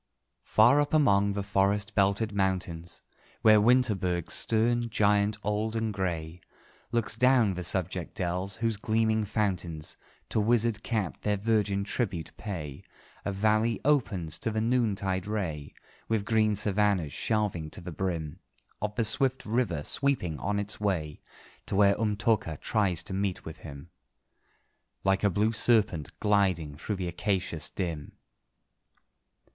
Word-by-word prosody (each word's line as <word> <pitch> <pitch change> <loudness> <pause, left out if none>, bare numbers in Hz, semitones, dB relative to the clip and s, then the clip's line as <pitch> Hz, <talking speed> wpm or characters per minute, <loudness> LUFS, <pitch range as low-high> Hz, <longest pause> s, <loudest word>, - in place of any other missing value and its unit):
_ - - -53 0.4
Far 125 +7 +5
up 145 +1 0
among 100 -9 +3
the 100 0 -2
forest 100 +2 +1
belted 100 +2 +1
mountains, 90 -3 -2 0.4
Where 110 -2 +7
Winterberg, 105 -8 +2
stern 115 +1 +1
giant 105 -1 +2
old 105 +2 -1
and 110 -1 -1
grey, 85 -3 -3 0.5
Looks 115 -2 0
down 125 -4 +4
the 90 0 -5
subject 90 0 -2
dells, 95 0 -2
whose 115 -2 -1
gleaming 110 +1 +1
fountains 90 -7 -2 0.3
To - - 0
wizard 115 0 +2
Kat 110 -8 -2
their 105 -1 0
virgin 105 -2 +1
tribute 100 -6 -3
pay, 80 -10 -6 0.4
A 100 - -1
valley 110 +3 +1
opens 100 - +1
to - - -1
the 110 0 -1
noontide 105 -5 0
ray, 85 -9 -3 0.4
With 110 -2 0
green 110 -1 +2
savannahs 100 -6 +1
shelving 105 -8 -1
to - - -7
the 90 0 -7
brim 85 -2 -3 0.4
Of 105 0 -3
the 115 - +1
swift 130 +4 0
river, 105 -10 0
sweeping 115 - 0
on 100 +2 -1
its 100 +1 -2
way 85 -8 -2 0.5
To - - -2
where 100 0 +5
Umtóka 105 -6 0
tries 95 -6 0
to 95 - -6
meet 95 -1 -2
with 80 - -8
him, 70 +2 -11 1.1
Like 95 +1 +2
a 100 - +4
blue 105 +4 +1
serpent 105 - +2
gliding 95 -8 +1
through 105 +8 -4
the 95 -2 -4
acacias 90 -4 -2
dim. 85 -6 -4
100 Hz, 140 wpm, -28 LUFS, 90-110 Hz, 1.1 s, Where